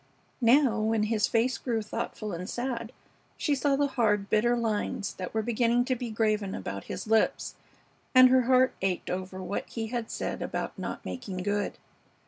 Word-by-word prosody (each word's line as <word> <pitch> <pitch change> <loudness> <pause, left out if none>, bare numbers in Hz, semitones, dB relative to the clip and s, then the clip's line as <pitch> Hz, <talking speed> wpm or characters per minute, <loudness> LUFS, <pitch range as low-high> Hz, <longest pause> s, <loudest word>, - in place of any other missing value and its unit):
Now, 240 -1 +4
when 220 0 +1
his 215 -1 +1
face 235 +2 +1
grew 230 -4 -1
thoughtful 210 0 -4
and 180 +4 -5
sad, 240 -2 -3 0.5
she 295 - +1
saw 280 0 +2
the 285 +1 +2
hard, 210 -7 +1
bitter 240 +3 +3
lines 215 -3 -1
that 185 - -6
were 220 0 -1
beginning 240 +1 +2
to 255 - 0
be 245 -1 -5
graven 215 -3 0
about 95 +1 -5
his - - -5
lips, 220 0 +1 0.6
and 255 0 +9
her 260 0 +5
heart 255 0 +5
ached 190 -2 -1
over 185 +1 -4
what 200 - -4
he 225 -2 -4
had 235 -2 -2
said - - -3
about - - -3
not - - -6
making 190 -7 -5
good. 205 +1 -1
225 Hz, 175 wpm, -28 LUFS, 205-245 Hz, 0.6 s, and